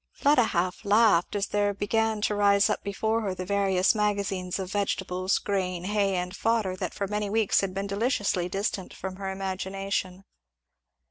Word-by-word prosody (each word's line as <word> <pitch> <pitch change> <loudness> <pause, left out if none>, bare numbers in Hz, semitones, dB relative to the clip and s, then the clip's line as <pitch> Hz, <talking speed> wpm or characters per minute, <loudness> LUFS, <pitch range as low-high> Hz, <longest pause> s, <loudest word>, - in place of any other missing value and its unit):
Fleda 285 -4 +3
half 180 -1 -1
laughed, 205 -4 +3
as 200 0 +1
there 205 0 0
began 220 +1 0
to 210 - +1
rise 200 -1 +4
up - - -2
before 220 +3 -1
her 195 -4 -2
the 185 0 -5
various 195 -1 +2
magazines 200 -4 -1
of 190 -1 -5
vegetables, 190 -2 0
grain, 185 -3 -2
hay, 200 0 +1
and 180 +1 -3
fodder, 225 -5 0
that - - -4
for 200 - -2
many 210 0 -2
weeks 220 -1 +2
had 195 -1 -2
been 195 +1 -2
deliciously 200 -4 0
distant 195 0 -3
from 190 0 -6
her 195 -1 -4
imagination. 190 0 -3
200 Hz, 165 wpm, -27 LUFS, 185-210 Hz, -, rise